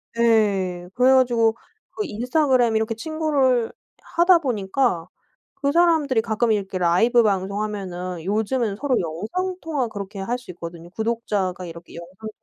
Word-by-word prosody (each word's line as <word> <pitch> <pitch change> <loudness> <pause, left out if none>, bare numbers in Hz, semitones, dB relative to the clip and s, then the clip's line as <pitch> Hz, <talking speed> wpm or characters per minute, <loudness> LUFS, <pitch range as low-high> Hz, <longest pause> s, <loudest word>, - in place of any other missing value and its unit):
네. 200 -6 +2
그래 255 +2 +5
가지고 240 -3 +3 0.4
그 425 - -3
인스타그램 250 -1 +1
이렇게 220 +1 0
친구를 270 -3 +1 0.4
하다 345 0 +6
보니까 215 - -1 0.5
그 280 0 -1
사람들이 320 -7 +3
가끔 225 +1 0
이렇게 195 -3 -2
라이브 205 +8 +4
방송하면은 190 -3 -2
요즘은 215 +2 0
서로 260 +1 0
영상 215 - -3
통화 290 -7 -2
그렇게 200 -1 -7
할 235 +6 -2
수 245 -7 -12
있거든요. 170 0 -9
구독자가 210 -4 -2
이렇게 170 0 -11
영상 185 +6 -9
220 Hz, 330 characters per minute, -23 LUFS, 190-255 Hz, 0.5 s, 하다